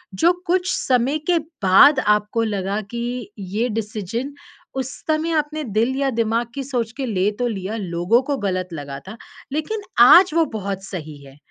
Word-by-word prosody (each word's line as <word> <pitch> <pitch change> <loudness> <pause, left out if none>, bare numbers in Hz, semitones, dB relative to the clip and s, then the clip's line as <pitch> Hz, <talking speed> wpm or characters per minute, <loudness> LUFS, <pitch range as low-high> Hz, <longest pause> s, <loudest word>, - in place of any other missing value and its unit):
जो 340 - +4 0.2
कुछ 365 +1 +1
समय 260 +3 +1
के 345 - +4 0.3
बाद 260 +9 +7
आपको 210 +1 +1
लगा 200 -1 -2
कि 240 -1 -4
ये 205 +6 -2
डिसीज़न 225 +4 -4 0.5
उस 265 +2 -6 0.2
समय 315 +1 0
आपने 300 +1 -3
दिल 230 +3 0
या 275 -1 +1
दिमाग 225 +1 0
की 275 - -3
सोच 245 -4 -2
के 270 - -2
ले 200 -3 +1
तो 245 - +1
लिया, 205 -1 -4
लोगों 180 +5 +1
को 280 - 0
गलत 185 -1 -1
लगा 140 -2 -6
था, 220 +4 -8 0.3
लेकिन 315 +9 -2 0.2
आज 355 +3 +7
वो 330 -1 +3
बहुत 195 -2 -4
सही 155 -6 -7
है, 135 +1 -15
230 Hz, 170 wpm, -21 LUFS, 195-275 Hz, 0.5 s, बाद